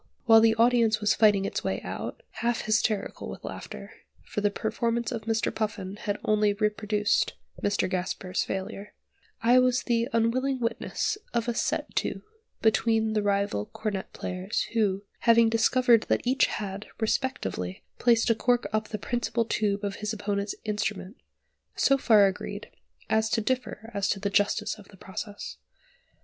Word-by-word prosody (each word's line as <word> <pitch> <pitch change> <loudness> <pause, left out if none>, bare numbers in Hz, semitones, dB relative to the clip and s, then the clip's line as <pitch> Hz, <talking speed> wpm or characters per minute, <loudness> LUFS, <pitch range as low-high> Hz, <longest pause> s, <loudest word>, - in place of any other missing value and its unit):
while 225 0 +8
the 225 0 +5
audience 230 -1 +4
was 210 0 +3
fighting 205 -3 +4
its - - -3
way - - -1
out, - - -6 0.2
half 235 0 +1
hysterical 215 -1 0
with - - -8
laughter - - -8 0.3
(for 210 - -4
the 205 - +3
performance 230 +3 -1
of 225 -3 -4
Mr. 225 -1 0
Puffin 205 -3 -3
had 205 0 -3
only 210 -1 +3
reproduced 210 0 +1 0.3
Mr. 205 0 +1
Gasper's 185 0 -2
failure), 200 +1 -5 0.5
I 245 +2 +6
was 250 -1 +2
the 235 -1 +1
unwilling 255 +4 +1
witness 235 - -2 0.2
of 235 0 0
a 240 - +1
"set - - -2
to" - - -1 0.4
between 220 0 +2
the 215 - +1
rival 200 - 0
cornet 215 -3 -4
players, 185 +3 -3
who, 205 -4 +1 0.2
having 230 -1 +5
discovered 230 +1 +4
that - - +1
each 255 +2 +3
had, 200 0 -5
respectively, 220 - -2 0.2
placed 235 -1 +4
a - - +6
cork 245 +1 +1
up 215 0 0
the 215 - -4
principal 235 0 -1
tube 205 -2 0
of 200 -1 -3
his 210 0 -3
opponent's 200 -1 -2
instrument, 210 -1 -2 0.6
so 275 - +4
far 215 -6 +6
agreed, 190 -1 -4 0.4
as 220 0 +2
to 225 - +1
differ 235 -1 -3
as 200 -1 0
to 200 - 0
the 200 0 -2
justice 205 +1 +1
of 200 - -14
the 195 - -17
process. 205 +2 -7
215 Hz, 160 wpm, -27 LUFS, 205-230 Hz, 0.6 s, while